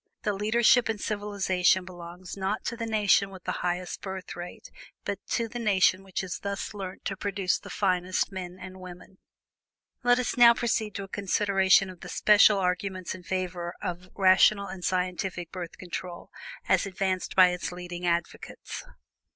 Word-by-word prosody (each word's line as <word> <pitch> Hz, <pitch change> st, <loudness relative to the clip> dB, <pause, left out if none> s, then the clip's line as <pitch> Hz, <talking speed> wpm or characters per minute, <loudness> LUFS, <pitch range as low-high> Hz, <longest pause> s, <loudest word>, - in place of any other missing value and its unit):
THE 210 Hz, -, +1 dB
LEADERSHIP 230 Hz, +4 st, +3 dB
IN 220 Hz, -, 0 dB
CIVILIZATION 200 Hz, -3 st, +1 dB
BELONGS 175 Hz, 0 st, -9 dB
NOT 195 Hz, +2 st, -2 dB
TO 235 Hz, -, -2 dB
THE 230 Hz, -1 st, -4 dB
NATION 205 Hz, -2 st, +3 dB
WITH 190 Hz, -2 st, -12 dB
THE -, -, -2 dB
HIGHEST 180 Hz, 0 st, -2 dB
BIRTH 190 Hz, -1 st, -6 dB
RATE, 175 Hz, 0 st, -9 dB, 0.3 s
BUT 200 Hz, -1 st, -2 dB
TO 230 Hz, -, 0 dB
THE 240 Hz, +2 st, -6 dB
NATION 190 Hz, -4 st, +3 dB
WHICH 190 Hz, -1 st, -4 dB
HAS 190 Hz, -2 st, -5 dB
THUS 200 Hz, +1 st, -4 dB
LEARNT 190 Hz, -2 st, -7 dB
TO 195 Hz, -, -2 dB
PRODUCE 195 Hz, -2 st, -1 dB
THE -, -, -11 dB
FINEST 185 Hz, -1 st, 0 dB
MEN 185 Hz, -1 st, -6 dB
AND 185 Hz, 0 st, -9 dB
WOMEN." 185 Hz, +1 st, -12 dB, 0.8 s
Let 245 Hz, -1 st, +4 dB
us 250 Hz, -, -1 dB
now 235 Hz, -1 st, +8 dB
proceed 225 Hz, -3 st, -1 dB
to 200 Hz, -, -4 dB
a -, -, -8 dB
consideration 195 Hz, -1 st, +2 dB
of 180 Hz, -, -14 dB
the -, -, -9 dB
special 210 Hz, 0 st, +5 dB
arguments 185 Hz, 0 st, -2 dB
in 185 Hz, -, -9 dB
favor 180 Hz, -1 st, -3 dB
of 180 Hz, +1 st, -5 dB
rational 195 Hz, +1 st, +5 dB
and 190 Hz, -2 st, -8 dB
scientific 180 Hz, -1 st, -2 dB
Birth 175 Hz, -3 st, -7 dB
Control 175 Hz, -1 st, -7 dB, 0.4 s
as -, -, +3 dB
advanced 190 Hz, -1 st, -2 dB
by 185 Hz, -1 st, +8 dB
its 180 Hz, 0 st, -3 dB
leading 175 Hz, 0 st, -6 dB
advocates. 170 Hz, 0 st, -3 dB
190 Hz, 165 wpm, -27 LUFS, 180-205 Hz, 0.8 s, now